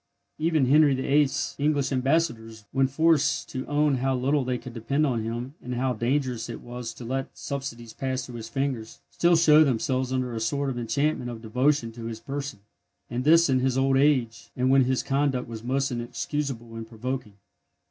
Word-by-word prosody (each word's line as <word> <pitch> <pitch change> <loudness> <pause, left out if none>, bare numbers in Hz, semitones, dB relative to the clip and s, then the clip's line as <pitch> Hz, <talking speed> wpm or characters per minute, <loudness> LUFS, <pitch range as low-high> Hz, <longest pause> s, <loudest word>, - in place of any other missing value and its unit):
Even 155 -3 +2
Henry 145 +1 +5
VIII.'s 140 +1 +1
English 145 -1 +1
ambassadors, 125 -6 0
when 135 0 +2
forced 160 +2 +2
to 130 - -5
own 145 -1 +2
how 130 +1 0
little 135 +3 +1
they 125 0 -1
could 125 0 -10
depend 135 +6 0
on 120 -5 0
him, 120 +4 -4
and 125 0 -5
how 130 +1 0
dangerous 120 0 -1
it 115 - -6
was 120 -1 -6
to 120 - -9
let 135 +2 -4
subsidies 120 -5 -5
pass 130 -1 -3
through 120 -1 -8
his 115 0 -7
fingers, 130 -4 -3
still 175 0 +3
show 155 -2 +6
themselves 130 -1 0
under 130 -2 -1
a 115 - -3
sort 140 +5 -1
of 120 - -4
enchantment 140 +2 0
of 115 -1 -8
devotion 125 +2 +1
to 115 0 -9
his 115 -1 -5
person, 135 -2 -5 0.5
and 125 +1 -2
this 165 +2 +6
in 130 -2 +2
his 130 0 +1
old 135 0 +3
age, 130 -5 +2
and 130 +1 +2
when 135 -1 +5
his 130 0 0
conduct 135 -2 0
was 115 -1 -7
most 135 +2 0
inexcusable 120 0 -4
and 115 0 -6
provoking. 120 0 -5
130 Hz, 190 wpm, -26 LUFS, 120-140 Hz, 0.5 s, show